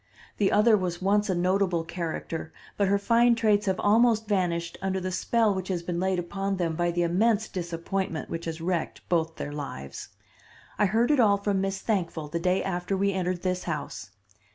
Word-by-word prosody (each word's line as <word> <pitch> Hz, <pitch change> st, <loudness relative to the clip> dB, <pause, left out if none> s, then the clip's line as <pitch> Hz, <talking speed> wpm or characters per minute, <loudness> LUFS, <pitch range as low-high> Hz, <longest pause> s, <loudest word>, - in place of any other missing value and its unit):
The 200 Hz, -2 st, +2 dB
other 215 Hz, +2 st, +5 dB
was 180 Hz, -3 st, -2 dB
once 205 Hz, +2 st, +2 dB
a 185 Hz, -, +1 dB
notable 180 Hz, -1 st, +1 dB
character, 165 Hz, -1 st, -5 dB, 0.2 s
but 200 Hz, -, +1 dB
her 200 Hz, +1 st, +3 dB
fine 235 Hz, +3 st, +4 dB
traits 210 Hz, -3 st, +2 dB
have 190 Hz, -1 st, +1 dB
almost 220 Hz, +1 st, +3 dB
vanished 175 Hz, -4 st, -1 dB
under 190 Hz, 0 st, -1 dB
the 185 Hz, 0 st, -3 dB
spell 225 Hz, +3 st, +2 dB
which 190 Hz, -1 st, -4 dB
has 180 Hz, -3 st, -2 dB
been 170 Hz, 0 st, -3 dB
laid 190 Hz, 0 st, +1 dB
upon 195 Hz, +3 st, -2 dB
them 165 Hz, -3 st, -1 dB
by 175 Hz, +1 st, +1 dB
the 175 Hz, 0 st, 0 dB
immense 215 Hz, +5 st, +2 dB
disappointment 170 Hz, -1 st, -3 dB
which 165 Hz, 0 st, -5 dB
has 165 Hz, 0 st, -5 dB
wrecked 170 Hz, 0 st, -3 dB
both 165 Hz, -2 st, +1 dB
their 145 Hz, -, -5 dB
lives. 135 Hz, -, -7 dB, 0.7 s
I 210 Hz, -, +4 dB
heard 230 Hz, +7 st, +2 dB
it 295 Hz, -, +3 dB
all 205 Hz, -4 st, +5 dB
from 200 Hz, -1 st, 0 dB
Miss 195 Hz, 0 st, -2 dB
Thankful 170 Hz, -8 st, -2 dB
the 170 Hz, -, -2 dB
day 180 Hz, +2 st, +1 dB
after 185 Hz, +1 st, -2 dB
we 200 Hz, +1 st, +1 dB
entered 180 Hz, -1 st, -2 dB
this 185 Hz, -1 st, -1 dB
house. 150 Hz, -, -5 dB
185 Hz, 195 wpm, -27 LUFS, 170-200 Hz, 0.7 s, other